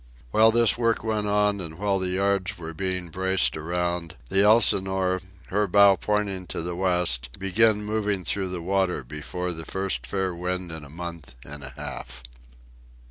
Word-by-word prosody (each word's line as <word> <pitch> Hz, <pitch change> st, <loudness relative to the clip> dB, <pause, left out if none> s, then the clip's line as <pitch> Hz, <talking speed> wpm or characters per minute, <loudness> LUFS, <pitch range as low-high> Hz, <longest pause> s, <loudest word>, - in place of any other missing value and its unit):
While 110 Hz, -, +6 dB
this 115 Hz, 0 st, +3 dB
work 115 Hz, -2 st, +1 dB
went 110 Hz, -2 st, -1 dB
on, 105 Hz, -1 st, +2 dB
and 80 Hz, -2 st, -6 dB
while 100 Hz, 0 st, 0 dB
the 95 Hz, -, -1 dB
yards 95 Hz, +1 st, 0 dB
were 80 Hz, -1 st, -7 dB
being 90 Hz, 0 st, -2 dB
braced 95 Hz, +2 st, +1 dB
around, 85 Hz, +1 st, -2 dB, 0.2 s
the 95 Hz, -, +4 dB
Elsinore, 95 Hz, -3 st, +3 dB, 0.3 s
her 105 Hz, +2 st, +1 dB
bow 100 Hz, +1 st, +6 dB
pointing 100 Hz, -3 st, -2 dB
to 80 Hz, -, -3 dB
the 85 Hz, 0 st, -4 dB
west, 90 Hz, -10 st, +2 dB
began 105 Hz, +2 st, +3 dB
moving 105 Hz, -2 st, -1 dB
through 95 Hz, +1 st, +1 dB
the 90 Hz, -2 st, -5 dB
water 95 Hz, -4 st, 0 dB
before 75 Hz, +7 st, -5 dB
the 80 Hz, -1 st, -6 dB
first 80 Hz, -11 st, -3 dB
fair 95 Hz, +3 st, -1 dB
wind 90 Hz, 0 st, -4 dB
in 80 Hz, -2 st, -7 dB
a 70 Hz, -, -12 dB
month 85 Hz, -4 st, -8 dB
and 70 Hz, 0 st, -6 dB
a 65 Hz, -, -9 dB
half. 60 Hz, 0 st, -7 dB
95 Hz, 170 wpm, -25 LUFS, 85-100 Hz, 0.3 s, While